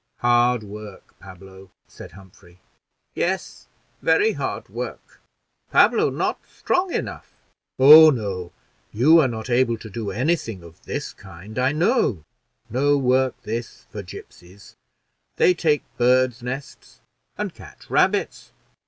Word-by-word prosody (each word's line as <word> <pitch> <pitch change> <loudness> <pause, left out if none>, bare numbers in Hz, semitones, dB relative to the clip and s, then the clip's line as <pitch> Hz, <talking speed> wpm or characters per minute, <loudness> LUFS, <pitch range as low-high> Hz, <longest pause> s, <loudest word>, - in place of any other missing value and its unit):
"Hard 120 -1 +2
work, 105 -1 -11
Pablo," 95 0 -14 0.2
said - - -13
Humphrey. 95 -2 -18 0.5
"Yes, 185 +1 -3 0.3
very 430 +2 +3
hard - - -5
work; - - -8 0.5
Pablo - - +4
not - - -2
strong 360 0 -1
enough." - - -5 0.4
"Oh 155 +4 +9
no, 100 - -3 0.4
you 150 +10 +5
are 145 - +3
not 110 -2 -6
able 120 -2 +1
to 110 -1 -11
do 105 0 -5
any 145 +9 +1
thing 105 - -8
of 85 -1 -16
this - - -5
kind, 95 +4 -10
I 130 +2 +2
know. 155 - +1 0.4
No 140 +5 +1
work 130 -1 +1
this 115 +2 -6
for 105 - -6
gipsies; 90 +1 -14 0.6
they 180 - +4
take 155 -4 0 0.2
birds' 125 0 +2
nests 130 +2 -8 0.4
and - - -4
catch - - -15
rabbits." - - 0
120 Hz, 125 wpm, -22 LUFS, 100-135 Hz, 0.6 s, Oh